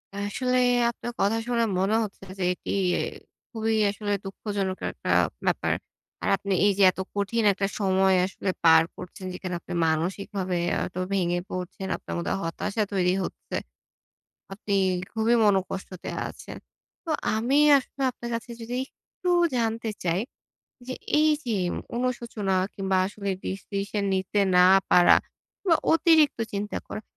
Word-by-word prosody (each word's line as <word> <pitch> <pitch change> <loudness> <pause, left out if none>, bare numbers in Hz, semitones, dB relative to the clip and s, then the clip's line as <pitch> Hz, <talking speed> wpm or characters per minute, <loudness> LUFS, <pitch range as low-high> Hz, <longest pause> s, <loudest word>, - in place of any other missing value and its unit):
আসলে 250 +6 -1 0.3
আপনার 240 0 -6
কথা 205 +3 +2
শুনে 235 -1 +1 0.2
মনে 195 +3 +2
হচ্ছে 195 -2 -8 0.2
যে 185 - 0
এটি - - -7 0.8
খুবই 225 -2 0
আসলে 205 0 -3
দুঃখজনক 195 -1 -3
একটা - - -7 0.4
ব্যাপার। - - +1 0.5
আর - - +1
আপনি 200 0 -2
এই 205 - +5
যে 200 - +4
এত 185 - -13 0.2
কঠিন 210 +3 0
একটা 195 0 -1
সময় 190 -1 +3
আসলে 190 0 -4
পার 160 -1 +7
করছেন 180 +1 -9
যেখানে 180 0 -5
আপনি 175 - -8
মানসিকভাবে 180 +3 -1 0.3
এত 180 - -9 0.2
ভেঙে 175 -2 +1
পড়ছেন। 185 +1 -5
আপনার - - -8
মধ্যে 170 - -1
হতাশা 200 +6 -2
তৈরি 180 -1 +2
হচ্ছে। - - -6 1.0
আপনি 200 0 -3 0.4
খুবই 225 +1 +2
মন 205 -2 +5 0.2
কষ্টতে 185 -1 -6 0.2
আছেন। - - -10 0.5
তো 335 - -5 0.2
আমি 240 +6 +1 0.2
আসলে 270 +1 -7
আপনার 240 -1 -8
কাছে 235 +1 -5
যদি 230 +2 -5
একটু 360 +5 -6 0.3
জানতে 225 -1 -1
চাই 175 +1 +1 0.7
যে 255 - -3 0.3
এই 310 0 +5
যে 230 -3 -1 0.4
অনুশোচনা 235 -5 -2 0.2
কিংবা 190 -1 0
আসলে 200 0 -4
ডিসিশন 200 +1 -3
নিতে 190 +2 0 0.2
না 180 0 +7 0.2
পারা 175 - +7 0.5
বা 335 - +6 0.2
অতিরিক্ত 320 -5 +4
চিন্তা 205 +1 -3
করা, - - -6
200 Hz, 140 wpm, -26 LUFS, 190-230 Hz, 1.0 s, পার